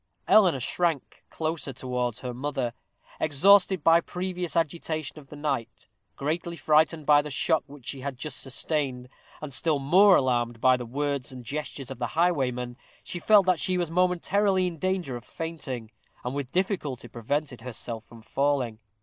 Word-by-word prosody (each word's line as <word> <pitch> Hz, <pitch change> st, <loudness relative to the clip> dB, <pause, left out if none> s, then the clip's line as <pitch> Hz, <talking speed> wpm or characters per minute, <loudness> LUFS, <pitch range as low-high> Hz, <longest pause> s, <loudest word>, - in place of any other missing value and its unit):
Eleanor 185 Hz, -10 st, +5 dB
shrank 160 Hz, +2 st, -1 dB
closer 160 Hz, -3 st, -3 dB
towards 125 Hz, -2 st, -3 dB
her 125 Hz, -1 st, -4 dB
mother. 130 Hz, -2 st, -2 dB, 0.5 s
Exhausted 185 Hz, +3 st, +5 dB
by 165 Hz, +1 st, +6 dB
previous 180 Hz, -2 st, -4 dB
agitation 155 Hz, -2 st, -2 dB
of 140 Hz, -2 st, -17 dB
the -, -, -9 dB
night, 135 Hz, -7 st, -3 dB, 0.3 s
greatly 170 Hz, +4 st, -3 dB
frightened 155 Hz, +2 st, +3 dB
by 145 Hz, 0 st, +6 dB
the 150 Hz, -, -7 dB
shock 155 Hz, +3 st, +1 dB
which 140 Hz, -3 st, -14 dB
she 135 Hz, -, -5 dB
had 135 Hz, -1 st, -4 dB
just 150 Hz, +2 st, -4 dB
sustained, 135 Hz, -2 st, -1 dB, 0.3 s
and 150 Hz, -3 st, -6 dB
still 155 Hz, +2 st, +1 dB
more 185 Hz, +8 st, +6 dB
alarmed 120 Hz, -3 st, +1 dB
by 130 Hz, +2 st, +5 dB
the 125 Hz, -1 st, -6 dB
words 140 Hz, +1 st, -2 dB
and 125 Hz, -2 st, -9 dB
gestures 140 Hz, -1 st, -5 dB
of 130 Hz, -, -7 dB
the -, -, -1 dB
highwayman, 125 Hz, -8 st, +1 dB, 0.3 s
she 175 Hz, -, -5 dB
felt 205 Hz, +2 st, +5 dB
that 185 Hz, -3 st, +3 dB
she 185 Hz, -1 st, 0 dB
was 175 Hz, -2 st, -1 dB
momentarily 185 Hz, +2 st, +2 dB
in 170 Hz, -3 st, -4 dB
danger 185 Hz, -7 st, -1 dB
of 120 Hz, -, -7 dB
fainting, 135 Hz, -8 st, -6 dB, 0.3 s
and 125 Hz, -, -2 dB
with 140 Hz, -2 st, -4 dB
difficulty 175 Hz, -, -1 dB
prevented 125 Hz, +3 st, -3 dB
herself 115 Hz, -2 st, -6 dB
from 115 Hz, -1 st, -15 dB
falling. 135 Hz, -4 st, 0 dB
145 Hz, 165 wpm, -27 LUFS, 125-170 Hz, 0.5 s, by